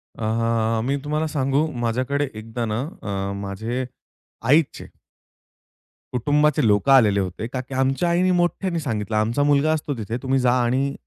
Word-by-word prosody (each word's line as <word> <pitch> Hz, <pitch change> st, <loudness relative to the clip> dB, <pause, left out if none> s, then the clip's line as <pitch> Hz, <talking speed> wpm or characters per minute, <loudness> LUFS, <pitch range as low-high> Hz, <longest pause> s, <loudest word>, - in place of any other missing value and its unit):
अ, 115 Hz, 0 st, 0 dB
मी 135 Hz, +2 st, +1 dB
तुम्हाला 150 Hz, +2 st, -1 dB
सांगू, 140 Hz, 0 st, +1 dB, 0.2 s
माझ्याकडे 130 Hz, +5 st, 0 dB
एकदा 115 Hz, +2 st, -5 dB
ना, 110 Hz, 0 st, -2 dB, 0.2 s
अ 100 Hz, -1 st, -3 dB
माझे 110 Hz, +6 st, -3 dB, 0.6 s
आईचे 150 Hz, +1 st, +2 dB, 1.3 s
कुटुंबाचे 145 Hz, +3 st, +2 dB
लोकं 105 Hz, +6 st, +3 dB
आलेले 110 Hz, -7 st, +5 dB
होते 95 Hz, +3 st, -3 dB
का 125 Hz, +1 st, -4 dB
की 130 Hz, +1 st, -11 dB
आमच्या 135 Hz, +6 st, +1 dB
आईने 180 Hz, +2 st, +2 dB
मोठ्याने 175 Hz, 0 st, 0 dB
सांगितलं, 110 Hz, -7 st, -3 dB
आमचा 115 Hz, +6 st, +1 dB
मुलगा 145 Hz, +1 st, +3 dB
असतो 150 Hz, -2 st, -2 dB
तिथे, 110 Hz, +1 st, -4 dB
तुम्ही 135 Hz, 0 st, +1 dB
जा 125 Hz, -1 st, +3 dB
आणि 135 Hz, +3 st, 0 dB
130 Hz, 145 wpm, -22 LUFS, 110-145 Hz, 1.3 s, आलेले